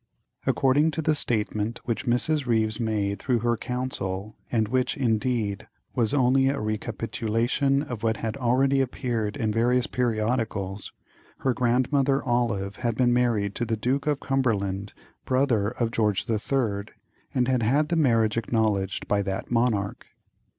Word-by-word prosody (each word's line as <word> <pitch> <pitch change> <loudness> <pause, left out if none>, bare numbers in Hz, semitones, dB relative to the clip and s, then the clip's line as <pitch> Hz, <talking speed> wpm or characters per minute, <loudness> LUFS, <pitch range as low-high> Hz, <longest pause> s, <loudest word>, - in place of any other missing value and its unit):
According 140 +4 +3
to 160 - -1
the 155 - +3
statement 110 -4 -1
which 120 +2 -2
Mrs. 135 +4 +1
Ryves 110 -1 +2
made 105 -3 -1
through 125 +2 +1
her 120 0 +2
counsel, 110 -5 -3 0.2
and 110 -3 +1
which, 130 +5 0
indeed, 110 -4 0 0.3
was 115 -3 +1
only 135 -1 +3
a 140 - -1
recapitulation 115 +5 0
of 120 -7 -6
what 110 -1 0
had 110 -1 -3
already 135 +2 +2
appeared 120 -4 -2
in 110 -5 0
various 120 +2 +2
periodicals, 110 -5 -1 0.5
her 130 - +2
grandmother 130 +3 +2
Olive 115 -5 0
had 120 -3 -1
been 120 0 +3
married 115 -5 +1
to - - -2
the 115 -1 -1
Duke 135 +6 -1
of 145 -2 +1
Cumberland, 105 -7 -1 0.3
brother 130 -6 +2
of 115 -1 -2
George 105 -4 +1
the 115 -3 0
Third, 105 -5 -2 0.4
and 125 -2 +2
had 130 -2 +2
had 140 +7 +2
the 170 - +1
marriage 115 -8 +2
acknowledged 105 -4 -1
by 100 -1 +2
that 95 +2 -4
monarch. 115 -5 0
120 Hz, 150 wpm, -26 LUFS, 110-130 Hz, 0.5 s, According